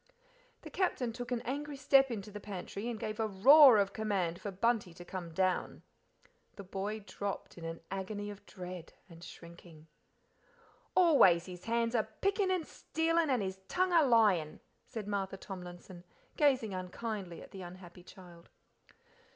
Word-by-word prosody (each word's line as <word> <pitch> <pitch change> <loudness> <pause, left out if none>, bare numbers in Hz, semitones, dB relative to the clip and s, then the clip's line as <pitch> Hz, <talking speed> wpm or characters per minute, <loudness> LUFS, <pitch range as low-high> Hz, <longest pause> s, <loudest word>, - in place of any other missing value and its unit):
The - - -9
Captain 255 -11 -1
took 245 +1 -7
an 240 -2 0
angry 285 +3 -4
step 270 0 +5
into 210 -3 -5
the 210 - -7
pantry 200 +2 -6
and 230 -3 -5
gave 215 +1 -4
a 220 - +1
roar 255 +6 +8
of 200 -1 +1
command 195 -6 -1
for 205 - -4
Bunty 200 -2 0
to 175 - -11
come 175 -2 -6
down. 185 +2 -1 0.7
The 200 - -8
boy 200 +3 -4
dropped 200 +1 -5
in 170 - -9
an 165 0 -6
agony 205 +2 -4
of 205 - -12
dread 180 -3 -8
and 170 -2 -14
shrinking. 170 -2 -13 1.1
"Always 275 - +6
his 180 -1 -10
hands 230 0 0
a 230 - +3 0.2
pickin' 395 0 +1
and 365 -4 0
stealin' 325 +1 0
and 250 -6 +1
his 190 0 -4
tongue 370 0 +1
a 335 - +7
lyin'," 215 - +3 0.3
said 215 -3 -6
Martha 195 -2 -2
Tomlinson, 180 -1 -9 0.3
gazing 260 -8 +2
unkindly 185 0 -5
at - - -15
the 190 - -9
unhappy 180 0 -11
child. 175 -2 -15
200 Hz, 160 wpm, -33 LUFS, 180-240 Hz, 1.1 s, roar